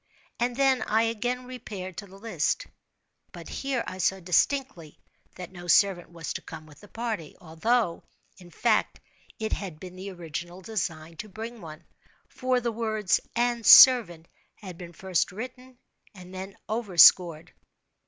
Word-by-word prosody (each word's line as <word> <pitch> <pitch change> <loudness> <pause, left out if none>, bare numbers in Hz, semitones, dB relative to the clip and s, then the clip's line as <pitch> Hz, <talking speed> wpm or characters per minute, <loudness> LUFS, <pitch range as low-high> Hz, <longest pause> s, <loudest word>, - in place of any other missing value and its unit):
And 240 +1 0
then 265 -2 +2
I 220 +1 +1
again 245 +3 -2
repaired 205 -7 -8
to 200 - -7
the 195 +1 -15
list—but 230 - -6
here 270 -3 -3
I 185 - -7
saw 190 +2 +1
distinctly 180 - -1 0.4
that 180 -1 -9
no 175 -1 -11
servant 175 0 +3
was 170 -1 -6
to - - -6
come 155 - -10
with 150 -2 -17
the 205 - -15
party, 220 -9 -5
although, 180 +3 -1 0.4
in 180 -1 -14
fact, 215 +5 0 0.4
it 220 -1 -3
had 180 -7 -6
been 180 +1 -10
the 190 +2 -7
original 175 0 -7
design 165 -5 -5
to 215 - -8
bring 225 +3 -8
one—for 170 +10 -5
the 235 0 -1
words 220 -3 0 0.2
"and 240 -1 0
servant" 210 -11 +8 0.3
had 185 -5 -10
been 175 0 -10
first 185 -1 -1
written 250 +5 -9 0.4
and 180 -1 -12
then 190 +1 -8
overscored. 180 - +4
195 Hz, 145 wpm, -27 LUFS, 175-235 Hz, 0.4 s, servant